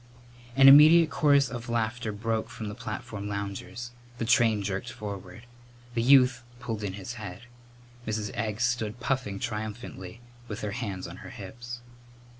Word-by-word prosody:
An 135 0 +8
immediate 155 +4 +9
chorus 140 -2 +4
of 120 0 -6
laughter 115 0 -1
broke 110 +2 -2
from 110 -2 -6
the - - -6
platform 105 -2 -6
loungers. 100 +3 -5 0.3
The 115 - -2
train 115 -3 +3
jerked 100 +4 -3
forward. 100 -3 -7 0.5
The 115 - 0
youth 125 -1 +5 0.2
pulled 115 -5 -4
in 100 -2 -3
his 100 +4 -6
head. 100 0 -7 0.7
Mrs. 105 -1 -2
Egg 110 0 -3
stood 120 -2 0
puffing 125 -6 -1
triumphantly 110 -3 -5 0.3
with 105 -1 -6
her 105 - -3
hands 100 -5 -4
on - - -9
her - - -10
hips. 120 0 -8
115 Hz, 150 wpm, -28 LUFS, 105-120 Hz, 0.7 s, immediate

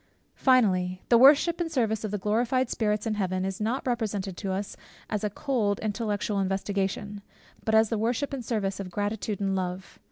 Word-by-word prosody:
Finally 185 -8 +2
The 235 - +7
worship 295 +6 +6
and 330 -1 -2
service 225 -7 0
of 215 - -2
the 210 - -2
glorified 235 +5 0
spirits 210 -2 0
in 225 - 0
Heaven, 185 -2 -1
is 190 +1 -4
not 235 +5 -1
represented 210 -6 -2
to 195 -3 -3
us 195 +1 -3 0.4
a 210 -1 -1
cold 210 -3 0
intellectual 210 -1 -1
investigation, 195 +1 -2 0.4
but 220 - +1
as 220 -1 +5
the 225 - -1
worship 245 +6 -1
and 265 -3 -4
service 205 -5 -2
of 195 -2 -5
gratitude 205 +2 -2
and 195 -1 0
love. 185 0 -4
210 Hz, 180 wpm, -27 LUFS, 195-235 Hz, 0.4 s, The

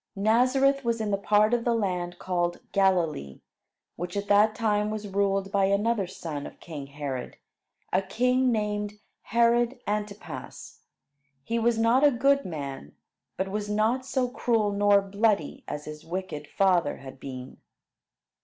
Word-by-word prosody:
Nazareth 255 +7 +3
was 235 -1 0
in 215 -2 -1
the - - +3
part 210 +2 +3
of 240 -1 +2
the 235 -1 +2
land 180 -5 -2
called 175 -1 -1
Galilee, 170 - +1 0.6
which 175 +3 -4
at 200 0 -3
that 210 +1 +5
time 210 -2 +1
was 215 -1 -4
ruled 195 0 0
by 200 -1 +3
another 200 +1 +1
son 160 -5 -6
of - - -14
king 150 -5 -8
Herod, 140 -3 -5 0.6
a 185 - +4
king 250 +6 +1
named 210 -2 -1 0.3
Herod 235 +2 +2
Antipas. 205 - -5 0.6
He 230 +9 -1
was 230 0 +2
not 230 +4 +3
a 295 - +8
good 275 +2 +2
man, 140 - -6 0.4
but 190 0 -1
was 210 0 -3
not 220 +5 +1
so 260 -1 0
cruel 230 -4 +1
nor 200 0 +4
bloody 200 -4 0
as 150 - -5
his 150 0 -8
wicked 165 -4 -5
father 180 -4 +2
had 135 -1 -11
been. 130 -1 -8
205 Hz, 150 wpm, -27 LUFS, 175-230 Hz, 0.6 s, a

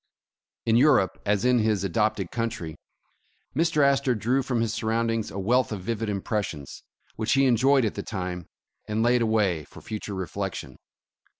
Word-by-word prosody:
In 115 0 +4
Europe, 125 - +3
as 105 +2 +2
in 125 -1 +4
his 110 -3 +1
adopted 100 0 0
country, 115 -9 -3 0.8
Mr. 155 -1 +2
Astor 140 -2 +2
drew 120 +5 +1
from 125 -2 -1
his 115 -1 0
surroundings 115 0 -1
a - - -8
wealth 120 +7 +2
of 105 -3 -4
vivid 115 +2 -2
impres 105 +1 -1
sions, 70 -2 -9 0.3
which 110 0 +1
he 135 0 +4
enjoyed 130 +1 +4
at 105 - -1
the - - -4
time, 90 -4 -5 0.4
and 110 +1 0
laid 120 +1 +3
away 105 -8 +1
for - - -14
future 105 -2 -6
reflection. 95 0 -5
110 Hz, 165 wpm, -26 LUFS, 100-125 Hz, 0.8 s, In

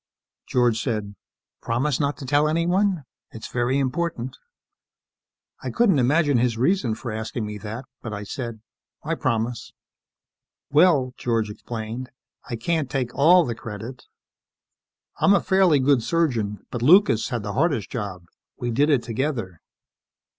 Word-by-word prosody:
George 120 -3 +2
said, 105 -5 -3 0.5
"Promise 125 +4 0
not 145 -1 0
to 140 - -8
tell 145 +3 +3
anyone? 175 +2 +1 0.3
It's 110 - -9
very 125 +2 0
important." 135 -2 -2 1.3
I - - -4
couldn't 220 - +3
imagine 145 +1 +3
his 120 -2 +1
reason 130 - +1
for 120 +1 -6
asking 110 +1 -4
me 105 0 -6
that, 110 +6 -6 0.2
but 110 - -6
I 105 -1 -5
said, 115 +1 -6 0.4
"I 160 - -1
promise." 115 -5 -2 1.0
"Well," 145 -5 +4
George 115 -3 -1
explained, 115 +3 -6 0.4
"I 120 - -2
can't 145 +4 -1
take 125 -3 -2
all 170 +4 +5
the 120 - -2
credit. 115 +3 -8 1.1
I'm 200 - +5
a - - +4
fairly 190 -6 +3
good 135 -1 +3
surgeon, 115 -10 -1
but 120 - -4
Lucas 165 - +5
had 120 -5 -3
the 100 0 -4
hardest 140 - 0
job. 100 -6 -5 0.3
We 120 -1 -3
did 145 +6 +2
it 140 -5 +3
together. 115 - -3
125 Hz, 140 wpm, -24 LUFS, 115-150 Hz, 1.3 s, all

